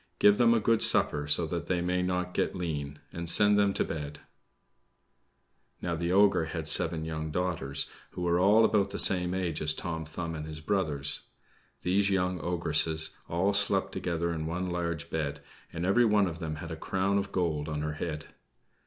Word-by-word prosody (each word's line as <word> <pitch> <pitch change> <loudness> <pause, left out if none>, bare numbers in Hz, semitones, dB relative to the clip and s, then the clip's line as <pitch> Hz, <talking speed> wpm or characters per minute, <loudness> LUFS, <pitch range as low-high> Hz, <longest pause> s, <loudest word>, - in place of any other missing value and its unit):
"Give 105 +2 +5
them 120 -1 +5
a - - +3
good 115 +1 +2
supper, 75 0 +3
so 80 +3 +3
that 85 +1 -4
they 90 -1 0
may 90 +1 0
not 90 0 -2
get - - -1
lean, 75 -5 -4 0.2
and 85 0 -3
send 105 +3 +4
them 100 -1 +3
to - - +1
bed." 75 -2 -5 1.6
Now, 85 - -3
the 85 +1 -2
ogre 100 -3 +4
had 80 -1 -4
seven 80 0 +3
young 80 -1 -4
daughters, 80 -5 -2 0.2
who 90 - -6
were 85 0 +2
all 105 +4 +5
about 105 -3 +2
the - - -5
same 90 -1 +3
age 90 -5 -2
as 75 0 +1
Tom 80 -2 -4
Thumb 80 +2 -5
and 75 -1 -6
his 80 0 -7
brothers. 75 -6 +1 0.6
These 100 +2 +2
young 90 -2 0
ogresses 80 -1 0 0.2
all 95 +4 +1
slept 100 -1 +1
together 85 -1 -2
in 80 -1 -4
one 90 +2 -3
large 85 -4 -3
bed, 75 -3 -2 0.3
and 85 +2 -4
every 120 +6 +4
one 105 -2 +3
of 85 -2 -5
them 80 -3 -4
had 80 +2 -8
a - - -4
crown 95 +4 0
of 100 0 -5
gold 80 -4 -1
on 75 -1 -3
her 75 0 -2
head. 75 -1 -5
85 Hz, 190 wpm, -29 LUFS, 80-95 Hz, 1.6 s, Give